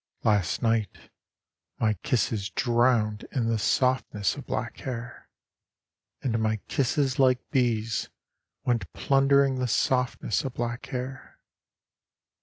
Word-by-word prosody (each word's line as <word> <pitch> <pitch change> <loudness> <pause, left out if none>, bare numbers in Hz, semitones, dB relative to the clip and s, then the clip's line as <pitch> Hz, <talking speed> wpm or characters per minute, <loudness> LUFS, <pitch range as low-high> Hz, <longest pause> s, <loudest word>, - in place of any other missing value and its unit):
—Last 105 -4 +1
night 115 -2 -1 0.7
my 110 -1 +2
kisses 110 - -1
drowned 115 -2 +1
in 125 -4 0
the 115 -1 +1
softness 125 -4 +1
of - - -9
black - - -3
hair. 120 -2 -7 0.9
And 115 -3 0
my 110 0 +1
kisses 135 +1 0
like 130 -2 +5
bees 115 -5 0 0.6
went 120 -2 0
plundering 135 -1 +3
the 125 - 0
softness 125 -2 +1
of 130 -2 -5
black 120 +1 -3
hair. 130 +1 -6
120 Hz, 110 wpm, -27 LUFS, 110-130 Hz, 0.9 s, like